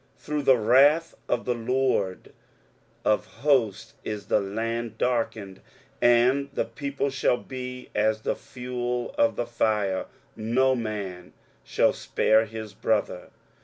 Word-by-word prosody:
23:009:019 - - -31
Through 150 0 -1
the 135 -2 +5
wrath 140 +9 +4
of 120 - 0
the 125 - +1
LORD 120 -5 -1 0.7
of 105 - +2
hosts 130 -6 0
is 105 -2 -5
the 100 - +2
land 115 +3 -3
darkened, 110 -6 -2 0.4
and 125 +4 +4
the - - 0
people 140 -1 -3
shall 130 -2 +1
be 125 -1 -7
as 110 +1 +1
the - - -1
fuel 125 - -4
of 290 0 +3
the 120 - -2
fire: 105 -5 0 0.3
no 125 +4 +2
man 100 -7 -5 0.3
shall - - +2
spare 110 +1 +2
his 110 -1 -8
brother. 100 -4 -1
120 Hz, 130 wpm, -26 LUFS, 110-130 Hz, 0.7 s, the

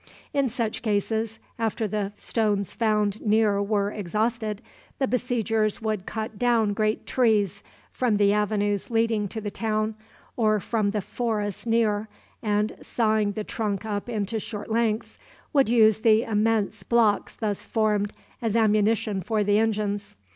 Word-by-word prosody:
In 275 -2 +2
such 230 -2 -2
cases, 220 +1 -1 0.2
after 225 0 0
the 205 -1 -2
stones 205 -3 -1
found 215 -2 +1
near 210 -2 +3
were 200 0 0
exhausted, 215 +2 -1 0.4
the 270 - +1
besiegers 225 -4 0
would 215 -4 -2
cut 220 -1 -5
down 230 -4 +3
great 215 +1 0
trees 215 -7 +2 0.3
from 235 -5 +1
the 205 0 +4
avenues 205 -1 0
leading 225 -2 +1
to 220 - -5
the 205 -1 -4
town, 215 0 -1 0.4
or 215 -3 +2
from 210 +1 0
the 210 0 -1
forests 210 -1 -3
near, 220 -2 +2 0.3
and, 210 0 0
sawing 215 -3 +1
the 215 - -3
trunk 210 -1 -3
up 205 +1 -3
into 220 -1 -2
short 210 0 -6
lengths, 225 -1 0 0.3
would 275 -5 +4
use 220 -3 +5
the 220 0 +4
immense 215 -2 0
blocks 215 0 +2
thus 210 -3 -2
formed 210 -2 +1 0.3
as 225 -2 -1
ammunition 215 -2 +2
for 215 +3 0
the 205 +1 +3
engines. 210 -2 -1
215 Hz, 145 wpm, -25 LUFS, 205-225 Hz, 0.4 s, use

